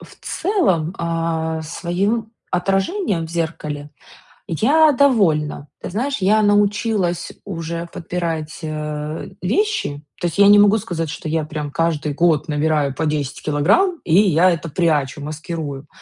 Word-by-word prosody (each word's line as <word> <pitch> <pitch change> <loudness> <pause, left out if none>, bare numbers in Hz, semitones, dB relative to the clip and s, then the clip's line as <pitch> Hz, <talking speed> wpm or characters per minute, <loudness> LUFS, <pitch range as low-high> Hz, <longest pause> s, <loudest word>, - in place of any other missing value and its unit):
в - - -14
целом, 190 - 0
а, 165 -1 -1
своим 195 +8 -2 0.2
отражением 195 - 0
в - - -12
зеркале 150 -3 -4 0.6
я 295 - +4
довольна. 185 - +2
Ты - - -5
знаешь, 260 +9 -1
я 205 +3 +3
научилась 205 -3 +1
уже 170 -2 -4
подбирать, 165 -2 -4
э, 150 0 -4
вещи. 200 - 0 0.2
То 175 - 0
есть 170 - -5
я 200 - +7
не 205 0 +8
могу 205 +1 +6
сказать, 175 -7 -3
что 160 0 -5
я 160 -1 0
прям 150 -2 -5
каждый 160 -2 0
год 160 -1 +2
набираю 150 -2 +1
по 160 +4 -2
10 150 -2 -2
килограмм 200 - +2
и 160 - -1
я 185 -2 +4
это 165 -1 -3
прячу, 150 -3 0
маскирую. 150 -1 -5
165 Hz, 140 wpm, -20 LUFS, 155-200 Hz, 0.6 s, не